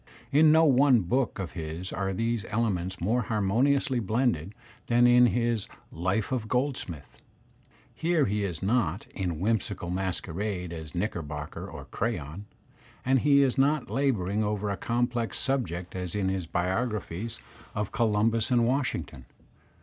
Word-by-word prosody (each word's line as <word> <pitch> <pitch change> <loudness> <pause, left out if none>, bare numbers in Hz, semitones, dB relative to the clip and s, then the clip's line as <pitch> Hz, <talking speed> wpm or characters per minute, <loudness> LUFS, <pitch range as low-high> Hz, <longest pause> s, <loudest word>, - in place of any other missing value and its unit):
In 155 +2 +6
no 160 +1 +6
one 135 -4 +5
book 120 +6 0
of 95 -4 -4
his 80 +2 -6
are 95 -1 -1
these 115 +3 -1
ele 115 +1 +1
ments 90 +1 -4
more 110 +8 +1
harmoniously 125 +5 +1
blended 110 - 0 0.3
than 120 +1 +4
in 120 0 +7
his 120 -3 0 0.2
*'Life 95 +7 -1
of 120 -4 -1
Gold 130 +4 +1
smith." 80 - -9 0.7
Here 165 -2 +1
he 105 0 0
is 90 -3 -4
not 100 -4 +1
in 90 -5 -3
whimsical 100 -3 -1
masquerade 90 0 -3
as 80 -2 -7
Knicker 90 -1 -1
bocker 75 -1 -6
or - - -8
Crayon, 100 -4 -3 0.6
and 130 +1 +4
he 140 +1 +5
is 135 0 +1
not 140 0 +2
labouring 110 -7 +1
over 105 -1 -1
a - - -1
complex 120 -1 -1
subject 90 -11 -2
as 90 0 -4
in 100 -2 0
his 95 -3 -2
biographies 100 - -2 0.4
of 105 -1 -2
Columbus 115 0 +2
and 120 -2 +3
Washington. 115 - -2
105 Hz, 150 wpm, -28 LUFS, 90-125 Hz, 0.7 s, in